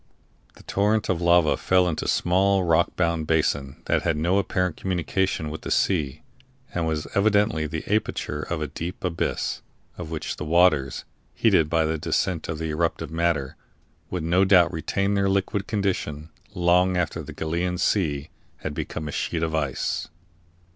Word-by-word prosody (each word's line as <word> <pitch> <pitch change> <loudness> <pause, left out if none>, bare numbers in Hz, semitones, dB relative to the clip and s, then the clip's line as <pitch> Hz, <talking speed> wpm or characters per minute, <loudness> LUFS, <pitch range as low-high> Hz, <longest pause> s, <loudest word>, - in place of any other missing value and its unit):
The - - -16
torrent 105 +2 +1
of 90 -2 0
lava 85 -2 +4
fell 90 -1 +3
into 85 - -2
a - - -3
small 95 +2 +2
rock 85 0 +2
bound 85 -3 0
basin 70 -4 0
that - - +1
had 85 -3 0
no 85 +6 +2
apparent 90 -3 -1
communication 90 -3 -1
with 80 - -6
the - - -6
sea, 75 -9 0 0.5
and 85 -2 -1
was 80 -1 -1
evidently 100 -6 +2
the 80 +1 -5
aperture 105 -7 -1
of 80 0 -3
a - - -2
deep 80 +5 -6
abyss, 90 -2 -2 0.4
of 85 -3 -6
which 80 -1 -4
the - - -4
waters, 75 -5 +2 0.3
heated 75 -2 +3
by 80 -1 +2
the 80 0 -1
descent 85 +1 -1
of 80 - -2
the 80 0 -3
eruptive 80 +1 -1
matter, 80 -5 0 0.5
would 90 -3 -3
no 90 +4 +3
doubt 95 -3 +5
retain 100 +5 -1
their 100 -1 +2
liquid 100 +1 0
condition 90 -7 -2 0.2
long 90 +1 +3
after 85 -4 -1
the - - -8
Gallian 85 +3 -2
Sea 75 -7 0 0.3
had 75 - -5
become 75 +1 -4
a - - -4
sheet 80 +2 -2
of 80 -1 -1
ice. 75 -5 -1
85 Hz, 170 wpm, -25 LUFS, 80-95 Hz, 0.5 s, doubt